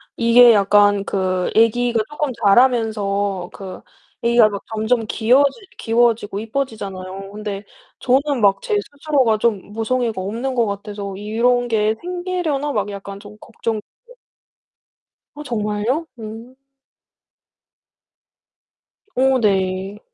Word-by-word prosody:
이게 235 0 +6
약간 205 0 +4
그 185 -2 -1
애기가 230 +1 +3
쪼끔 295 -2 -2
자라면서 205 -4 +2
그 190 -2 -9 0.4
애기가 235 -1 +5 0.3
점점 225 +2 0
귀여워지 270 - +2 0.2
귀여워지고 225 -3 +1
예뻐지잖아요. 195 -6 -5
근데 205 -1 -6 0.3
저는 270 0 +1
막 200 -1 +3
제 445 -3 -1
스스로가 280 - 0
좀 210 -3 -1
모성애가 225 -2 -1
없는 235 +7 -3
것 235 -3 +2
같아서 200 -1 -5
'이런 240 +4 +1
게 220 -1 +1
생기려나?' 350 -5 -2
막 205 -1 -1
약간 200 0 -8
좀 205 +1 -13
걱정 225 -2 -4 1.5
어, 295 - -8
정말요? 225 +5 -2
음. 225 +3 -9 2.6
오, 265 +1 +3
네. 195 -1 0
220 Hz, 225 characters per minute, -20 LUFS, 200-250 Hz, 2.6 s, 이게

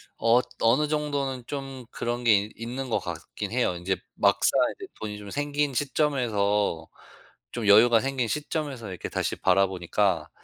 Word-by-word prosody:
엇 120 +2 +3 0.2
어느 130 +7 +3
정도는 140 -4 -2
좀 135 -3 -6
그런 120 +1 -3
게 115 - +5
있 110 - -13
있는 125 +3 -5
것 - - +1
같긴 105 -1 -6
해요. 120 -6 +1
인제 90 +2 -2 0.2
막상 - - +3 0.2
인제 - - -9
돈이 105 -1 -5
좀 105 -1 -9
생긴 145 +3 -1
시점에서 110 - 0 0.6
좀 115 -4 -3
여유가 115 +3 +7
생긴 135 -3 -1
시점에서 145 -5 -3
이렇게 90 - -6
다시 - - -2
바라보니까 95 -2 +1
120 Hz, 305 characters per minute, -26 LUFS, 105-135 Hz, 0.6 s, 여유가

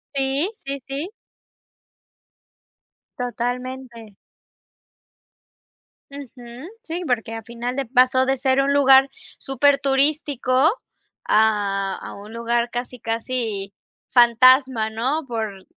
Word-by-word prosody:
Sí, 275 +6 +1 0.2
sí, 275 0 -3
sí. 280 +6 -4 2.1
Totalmente. 245 -2 -5 2.0
Ujú. 255 -1 -11 0.2
Sí, 340 -1 -4
porque 230 -2 -2
a 225 - -6
final 235 +3 -6
de 275 0 -2
pasó 255 +1 +3
de 270 0 0
ser 265 +1 +2
un 280 +1 +1
lugar 270 -1 +5 0.3
superturístico 275 0 +1 0.6
a 205 -3 +1
a - - -9
un 205 +2 -12
lugar 235 +1 -1
casi, 245 +1 -6
casi 225 -4 -3 0.3
fantasma, 245 -1 +4
¿no?, 265 +8 -2
por 220 -5 -5
255 Hz, 95 wpm, -21 LUFS, 230-270 Hz, 2.1 s, lugar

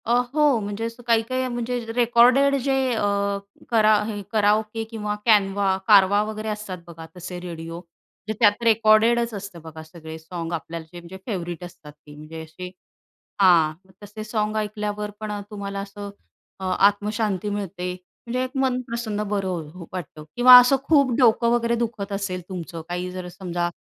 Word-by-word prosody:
अ, 235 - +1 0.2
हो, 295 -5 +4
म्हणजे 205 +1 -5
असं 230 +1 -7
काही-काही 235 +3 +1
म्हणजे 245 0 -3 0.2
रेकॉर्डेड 245 +4 +5
जे 270 +2 0 0.2
अ, 225 - -1 0.7
करा 215 -2 +4
हे 210 -2 -4
कराओके 215 +1 +1
किंवा 210 -2 -3
कॅनव्हा, 200 -3 +3
कारवा 205 -1 +6
वगैरे 215 0 -5
असतात 210 -3 -5
बघा 165 -1 -10
तसे 180 0 -7
रेडिओ. 165 -1 -7
म्हणजे 180 +4 -11
त्यात 210 0 +4
रेकॉर्डेडच 225 +1 +4
असतं 200 -4 -8
बघा 160 0 -10
सगळे 160 0 -10
सॉन्ग 165 +1 -6
आपल्याला 165 0 -5
जे 175 - -8
म्हणजे 175 +2 -11
फेवरेट 175 -5 -4
असतात 165 -4 -11
ते 150 0 -16
म्हणजे 155 +2 -9
असे 180 +3 -9 0.7
हां, 170 -5 +5
मग 190 - -22
तसे 205 +1 -8
सॉन्ग 215 0 -2
ऐकल्यावर 210 0 -3
पण 215 -1 -5
अ, 205 - -3
तुम्हाला 200 -1 -5
असं 200 +1 -7 0.5
अं, 185 -1 -1
आत्मशांती 205 0 +1
मिळते. 185 -3 -4 0.3
म्हणजे 250 +2 -1
एक 255 - -5
मन 255 -1 +1
प्रसन्न 225 -3 -3
बरं 185 -6 -2
हो, 180 -2 -10
वाटतं 175 -4 -7
किंवा 250 +1 +10
असं 250 +2 +4
खूप 280 -5 +4
डोकं 235 -1 +4
वगैरे 235 0 +1
दुखत 225 -4 -3
असेल 195 -2 -3
तुमचं 170 -3 -6
काही 180 +1 -3
जर 185 -1 -6
समजा 175 -2 -2
205 Hz, 165 wpm, -23 LUFS, 180-230 Hz, 0.7 s, किंवा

